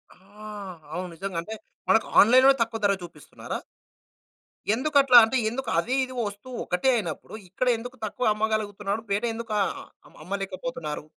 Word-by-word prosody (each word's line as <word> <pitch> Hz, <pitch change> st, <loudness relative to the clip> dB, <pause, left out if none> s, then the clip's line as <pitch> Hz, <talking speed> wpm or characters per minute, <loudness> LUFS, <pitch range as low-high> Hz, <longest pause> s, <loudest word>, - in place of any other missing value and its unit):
ఆహ్! 200 Hz, -1 st, -10 dB
అవును. 180 Hz, +1 st, -4 dB
నిజంగంటే 190 Hz, +2 st, -4 dB, 0.4 s
మనకు 225 Hz, -, +4 dB
ఆన్‌లైన్‌లోనే 260 Hz, +5 st, +6 dB
తక్కువ 230 Hz, 0 st, -1 dB
ధర 200 Hz, -, +4 dB
చూపిస్తున్నారా? 175 Hz, -, -8 dB, 1.2 s
ఎందుకట్లా? 275 Hz, -1 st, +5 dB
అంటే 260 Hz, +4 st, -1 dB
ఎందుకదీ, 240 Hz, -2 st, -1 dB
ఇదీ 255 Hz, -, -10 dB
వస్తువు 205 Hz, +5 st, -8 dB
ఒకటే 180 Hz, +9 st, +1 dB
అయినప్పుడు. 175 Hz, -7 st, -4 dB, 0.2 s
ఇక్కడ 255 Hz, +7 st, -2 dB
ఎందుకు 245 Hz, +3 st, -8 dB
తక్కువ 215 Hz, +1 st, 0 dB
అమ్మగలుగుతున్నాడు? 210 Hz, -1 st, -2 dB
బయట 205 Hz, +4 st, +1 dB
ఎందుకు 225 Hz, -1 st, -5 dB
ఆహ్, -, -, -4 dB, 0.4 s
అమ్మలేకపోతున్నారు? 190 Hz, -3 st, -5 dB
215 Hz, 125 wpm, -26 LUFS, 195-245 Hz, 1.2 s, ఆన్‌లైన్‌లోనే